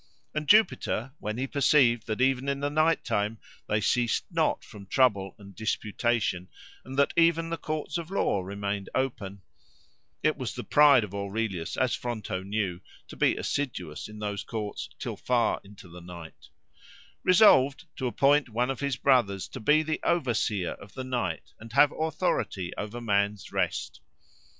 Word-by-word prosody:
And 150 -1 -3
Jupiter, 135 - +3
when 105 +2 -4
he 130 - -1
perceived 130 -4 +3
that 110 +2 -2
even 135 +1 +2
in 140 0 -1
the 145 +1 -1
night 155 +2 +2
time 105 +2 -1 0.3
they 105 - +1
ceased 120 +3 +1
not - - +1
from 100 -2 -12
trouble 100 -7 +2
and 100 -1 -13
disputation, 110 -3 -1 0.3
and 135 +1 -8
that 140 - +3
even 165 0 +3
the 165 - -1
courts 155 +2 -3
of 165 0 -7
law 185 - +1
remained 100 +1 -4
open 100 -7 -3 0.8
(it 155 0 +2
was 130 -4 -4
the 125 - -5
pride 145 -5 +6
of 100 -2 -7
Aurelius, 100 -3 -3
as 130 -2 +1
Fronto 110 -6 -3
knew, 95 -2 -2 0.3
to - - -9
be - - +2
assiduous 95 - -3
in 105 0 -11
those 105 -1 -3
courts 105 -3 -5
till - - -5
far 120 -2 +1
into 100 -1 -14
the 90 +1 -12
night) 85 -2 -11 0.7
resolved 145 -8 +5
to 130 - -1
appoint 140 +2 +3
one 120 +4 0
of 135 - -5
his 140 -2 -1
brothers 120 -8 +2
to - - -8
be 150 +7 +4
the 155 0 -2
overseer 115 - 0
of 100 - -12
the 130 - -4
night 120 -10 -3
and 110 0 -11
have 145 +3 +6
authority 155 - -1
over 105 +3 -5
man's 100 -3 0
rest. - - -2
120 Hz, 165 wpm, -28 LUFS, 100-140 Hz, 0.8 s, pride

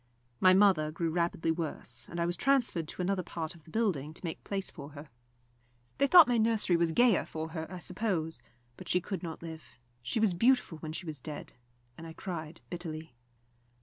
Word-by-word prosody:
My 185 0 +6
mother 190 -6 +5
grew 165 +1 -1
rapidly 170 -1 0
worse, 150 -7 -2
and 170 - -5
I 170 - +2
was 175 0 0
transferred 235 - +1
to 180 - -4
another 190 0 0
part 165 -1 -5
of 165 -3 -18
the - - -15
building 160 -8 -1
to - - -9
make 165 - -5
place 195 -1 -3
for 140 +1 -10
her. 145 0 -10 0.9
They 280 - +4
thought 345 0 +9
my 240 -2 +2
nursery 220 -5 +3
was 170 -1 +2
gayer 240 +1 +4
for 160 0 -5
her, 160 +1 -6
I 185 - -5
suppose; 180 -3 -2 0.4
but - - -10
she 180 - +3
could 190 +2 -5
not 165 -2 -6
live. 160 -1 -9 0.2
She 125 - -1
was 215 -4 +3
beautiful 230 -4 +2
when 155 -1 -6
she 170 +3 -5
was 155 -5 -5
dead, 150 +1 -7 0.5
and 165 - -8
I 160 - -8
cried 165 -3 -6
bitterly. 160 -4 -6
170 Hz, 200 wpm, -31 LUFS, 160-195 Hz, 0.9 s, thought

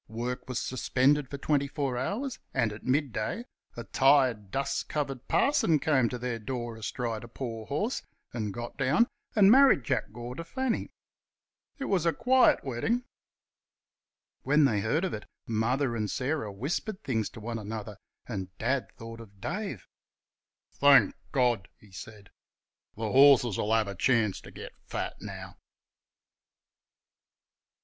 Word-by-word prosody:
Work 120 +3 -4
was 125 - -1
suspended 130 +2 +1
for 140 - -5
twenty 140 0 +1
four 140 -3 -2
hours, 225 - -3 0.2
and 115 -5 +1
at 105 - -11
midday, 135 - -1 0.3
a 120 - -4
tired, 130 -6 +3
dust 135 +6 -2
covered 135 -4 -3
parson 280 - +3
came 135 -5 +2
to 125 - -4
their 120 -1 -3
door 120 0 -4
astride 115 0 -4
a - - -9
poor 115 -2 -6
horse 205 - -1 0.3
and 110 -4 -2
got 120 +3 -7
down 140 - +3 0.3
and 205 -2 +7
married 265 - +6
Jack - - -1
Gore 120 +2 -7
to 165 - -6
Fanny. 260 +6 -2 0.9
It 275 - -4
was 180 -7 +1
a 165 - +3
quiet 255 - +4
wedding. 140 - -1 1.4
When 150 +2 +4
they 110 -6 +2
heard 145 - 0
of 185 - -3
it 105 - -6 0.2
Mother 120 +3 0
and 105 -2 -2
Sarah 130 -3 -2
whispered 175 - -3
things 110 -5 -1
to - - -11
one 115 +1 -4
another, 105 -1 -6 0.3
and 95 -5 -6
Dad 130 +3 -1
thought 115 0 -9
of 100 -3 -15
Dave. 170 - -4 0.8
"Thank 140 -1 +6 0.2
God!" 120 -8 +1
he 105 - -19
said, 100 +2 -11 0.6
"th' - - -34
horses'll 120 -3 +5
have 110 -2 +2
a 100 - -4
chance 110 -1 +1
ter - - -12
get - - -9 0.2
fat - - -4
now!" - - -8
125 Hz, 145 wpm, -29 LUFS, 110-145 Hz, 1.4 s, and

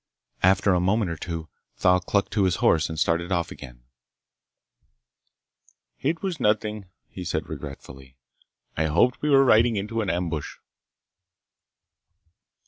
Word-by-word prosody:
After 95 +1 +4
a 90 - +2
moment 95 +1 +1
or - - -3
two 80 0 -6 0.3
Thal 90 0 +3
clucked 100 +2 -1
to 100 -3 +2
his 90 -2 +1
horse 80 -3 +2
and 80 - -6
started 85 +3 0
off 85 -3 -1
again. - - -11 2.2
"It 160 +6 -2
was 185 -5 -3
nothing," 105 -2 0 0.2
he 90 - -8
said - - -3
regretfully. 65 -2 -10 0.6
"I 80 - 0
hoped 85 +11 +2
we 150 - 0
were 135 -1 +6
riding 115 -1 +4
into 105 +3 -2
an 100 - -2
ambush." 85 -4 -3
90 Hz, 135 wpm, -25 LUFS, 80-110 Hz, 2.2 s, were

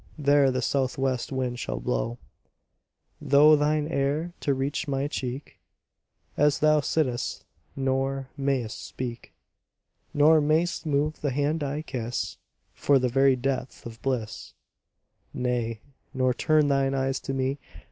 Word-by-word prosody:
There 145 -2 +4
the 130 -1 -1
south 130 0 0
west 135 -1 -1
wind 125 -2 -2
shall - - -3
blow - - -2 1.1
Through 150 +2 +7
thine 150 0 +1
hair 150 +3 -1
to 140 - 0
reach 140 +3 -2
my 140 0 -1
cheek, 130 -1 -5 0.8
As 145 0 +3
thou 155 0 +4
sittest, 135 -4 -1 0.3
nor 135 0 -1
mayst 135 -5 -2
speak, 120 -2 -6 0.8
Nor 155 +2 +5
mayst 160 +3 +1
move 150 +1 0
the 145 - 0
hand 145 +4 0
I 145 +2 -3
kiss 120 -5 -4 0.4
For 140 - +3
the 130 -1 +1
very 135 +1 +4
depth 130 0 -3
of 115 -1 -9
bliss; 125 -5 -3 0.8
Nay, 120 -3 -2 0.3
nor 130 -1 +2
turn 155 +3 +2
thine 135 -1 +1
eyes 135 0 0
to 135 - -5
me. 135 +2 -1
135 Hz, 135 wpm, -26 LUFS, 130-145 Hz, 1.1 s, Through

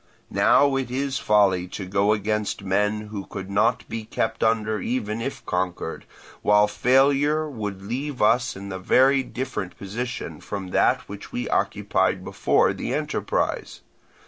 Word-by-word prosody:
Now 140 -1 +4
it 130 -3 -2
is 135 +2 -1
folly 95 -4 +3
to 95 +2 -6
go 100 +2 +2
against 105 -1 -1
men 105 +2 +1
who 100 -2 -6
could 95 -1 -7
not 110 +3 +1
be 115 -1 -5
kept 110 +1 -2
under 110 -1 +1
even 115 -1 -2
if 135 +4 -5
conquered, 90 -2 -3 0.4
while 105 0 +5
failure 140 +7 +3
would 105 -8 -5
leave 130 +6 -4
us 120 +4 +3
in 100 +1 -7
a 95 - -4
very 135 +8 +4
different 125 -9 -5
position 120 +5 -5
from 100 -2 -5
that - - +3
which 100 0 -9
we 120 - -3
occupied - - 0
before - - +2
the - - -3
enterprise. - - -2
105 Hz, 145 wpm, -24 LUFS, 100-125 Hz, 0.4 s, while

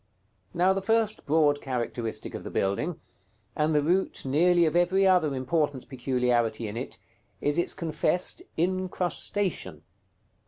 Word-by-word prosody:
§ - - -43
XXIV. 95 0 -33
Now 185 +2 +4
the 195 - -2
first 220 0 0
broad 145 -1 +3
characteristic 120 -4 -4
of - - -6
the - - -6
building, 150 - -1 0.6
and 150 0 +1
the 150 - +3
root 180 +1 0
nearly 170 +5 +4
of 155 0 0
every 180 +3 +3
other 175 -7 +3
important 135 +1 -1
peculiarity 125 -4 0
in 105 - -6
it, 120 - -5 0.4
is 145 +3 +1
its 175 - -1
confessed 175 +1 -1 0.2
incrustation. 180 - -1
150 Hz, 145 wpm, -27 LUFS, 125-180 Hz, 0.6 s, Now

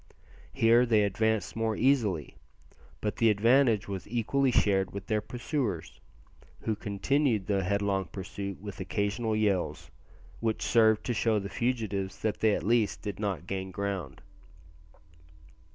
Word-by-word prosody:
Here 115 +2 +4
they 110 -3 +4
advanced 110 +2 0
more 115 -1 0
easily; 110 - +1 0.7
but 105 - -2
the 115 - +4
advantage 115 +1 +3
was 95 -2 -5
equally 125 +4 +1
shared 95 -5 +2
with 100 -1 -5
their 110 0 0
pursuers, 115 - -3 0.6
who 110 - -1
continued 110 +2 0
the 100 -1 0
headlong 100 0 0
pursuit 100 +2 -6
with 100 0 -8
occasional 100 +4 -1
yells, 100 -4 -1 0.5
which 110 -1 -1
served 110 -2 +4
to 120 - 0
show 110 -1 +1
the 100 -1 -3
fugitives 100 -6 -2
that 110 -1 -1
they 110 -2 +3
at - - -4
least 115 0 +1
did 105 -3 -5
not 95 -6 -2
gain 95 0 -4
ground. 95 -7 -4
105 Hz, 135 wpm, -29 LUFS, 100-115 Hz, 0.7 s, Here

